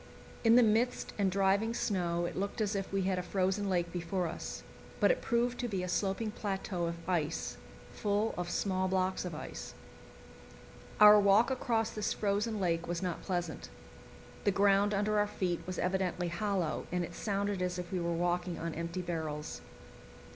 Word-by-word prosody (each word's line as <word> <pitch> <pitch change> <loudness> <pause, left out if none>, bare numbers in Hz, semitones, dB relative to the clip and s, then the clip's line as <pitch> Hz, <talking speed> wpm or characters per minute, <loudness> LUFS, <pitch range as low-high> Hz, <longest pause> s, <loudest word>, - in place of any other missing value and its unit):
In 225 0 +6
the 245 - +8
mist 225 +3 +1
and 195 -1 +3
driving 200 +4 +2
snow 175 -6 0
it - - -4
looked 200 +4 -3
as 210 -1 0
if 195 -1 -3
we 195 -1 0
had 185 -1 0
a - - -1
frozen 190 +2 0
lake 175 -2 0
before 175 +1 -1
us; 165 - -6 0.4
but - - +5
it - - -1
proved 240 +1 0
to 245 - -1
be 195 -5 -2
a - - -3
sloping 195 +4 -1
plateau 190 -4 -2
of 170 0 -6
ice, 160 - -1 0.4
full 210 +2 0
of 175 -1 -3
small 185 0 0
blocks 185 0 0
of 175 -3 -4
ice. - - -7 1.2
Our 210 0 +10
walk 205 +5 +5
across 230 -4 0
this 210 -1 -1
frozen 210 +1 0
lake 170 -3 0
was 175 +2 -2
not 180 -2 -2
pleasant. 175 -5 -3 0.7
The - - +3
ground 200 +1 +4
under 210 +1 +1
our 205 - +2
feet 180 -4 -1
was 185 - -4
evidently 180 -1 0
hollow, 185 -2 -1
and 180 0 0
it 170 - -6
sounded 200 -1 -1
as 180 0 -1
if 180 -1 -6
we 185 - -1
were 170 0 -1
walking 175 +1 0
on 165 0 -4
empty 170 +3 -4
barrels. 160 -3 -4
190 Hz, 180 wpm, -32 LUFS, 175-205 Hz, 1.2 s, Our